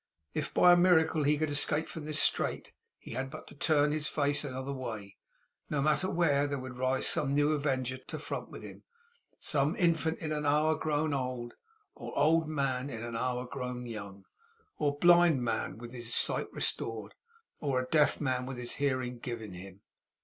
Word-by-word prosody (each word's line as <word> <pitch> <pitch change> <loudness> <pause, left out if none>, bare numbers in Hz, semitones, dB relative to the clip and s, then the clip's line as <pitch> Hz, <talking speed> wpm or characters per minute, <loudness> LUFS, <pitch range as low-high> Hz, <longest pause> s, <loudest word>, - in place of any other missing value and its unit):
If, - - -3
by 180 - +6
a - - +8
miracle, 165 -3 +4
he 145 +1 +3
could 155 0 -1
escape 150 +2 +2
from 160 -2 -7
this 155 -1 0
strait, - - +1 0.3
he - - -12
had 135 0 -3
but - - -9
to - - -13
turn 150 0 +2
his 155 0 -1
face 145 0 +1
another 130 0 -4
way, 110 -7 -6 0.5
no 150 - -1
matter 155 +5 +2
where, 150 -5 +2
and 145 - -4
there 140 - -1
would 130 -1 -7
rise 130 +1 0
some 140 -1 +3
new 145 +1 +3
avenger 130 -4 -1
front - - -22
to - - -5
front - - -5
with - - -10
him; - - -10 0.6
some 145 +4 +1
infant 165 -5 +1
in 155 -1 -5
an 150 -1 -1
hour 150 +2 +3
grown 155 0 -1
old, 125 -3 -3 0.4
or - - -8
old 160 +2 +3
man 135 -3 -1
in 115 -3 -6
an 120 -1 -5
hour 125 +1 -1
grown 125 -1 -5
young, 100 -4 -8 0.5
or 145 -1 0
blind 175 -4 +5
man 115 -2 -2
with 120 +1 -9
his 120 -2 -6
sight - - 0
restored, 110 -2 -3 0.5
or 130 -3 0
deaf 150 +3 +3
man 130 -3 -1
with 135 -1 -5
his 120 -1 -2
hearing 130 -3 -1
given 115 -5 -6
him. 95 +2 -11
140 Hz, 190 wpm, -31 LUFS, 125-155 Hz, 0.6 s, a